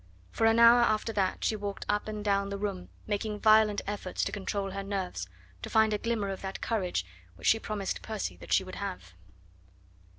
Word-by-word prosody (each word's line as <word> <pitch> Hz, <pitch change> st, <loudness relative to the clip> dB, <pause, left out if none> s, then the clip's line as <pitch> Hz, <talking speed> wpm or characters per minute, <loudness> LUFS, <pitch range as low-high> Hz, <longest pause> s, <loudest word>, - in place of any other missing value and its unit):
For 225 Hz, -, +2 dB
an 225 Hz, 0 st, +4 dB
hour 235 Hz, +1 st, +8 dB
after 225 Hz, -1 st, +1 dB
that 190 Hz, -3 st, 0 dB
she 220 Hz, -, +1 dB
walked 205 Hz, -1 st, -5 dB
up 210 Hz, +1 st, 0 dB
and 215 Hz, -1 st, -5 dB
down 200 Hz, -1 st, +1 dB
the 200 Hz, -, -3 dB
room 195 Hz, -3 st, -4 dB, 0.2 s
making 210 Hz, 0 st, -2 dB
violent 215 Hz, -1 st, +5 dB
efforts 200 Hz, -2 st, -3 dB
to -, -, -1 dB
control 200 Hz, -1 st, -3 dB
her 195 Hz, +1 st, -4 dB
nerves, 190 Hz, -, -4 dB, 0.3 s
to -, -, -6 dB
find 220 Hz, -1 st, +4 dB
a 210 Hz, -, 0 dB
glimmer 225 Hz, -3 st, -1 dB
of 195 Hz, -, -5 dB
that 190 Hz, 0 st, -5 dB
courage 185 Hz, -, -1 dB, 0.3 s
which -, -, -11 dB
she 225 Hz, -, +5 dB
promised 210 Hz, -3 st, -3 dB
Percy 220 Hz, -2 st, -4 dB
that -, -, -12 dB
she -, -, +4 dB
would 185 Hz, 0 st, -8 dB
have. 185 Hz, -, -6 dB
205 Hz, 200 wpm, -29 LUFS, 195-215 Hz, 0.3 s, hour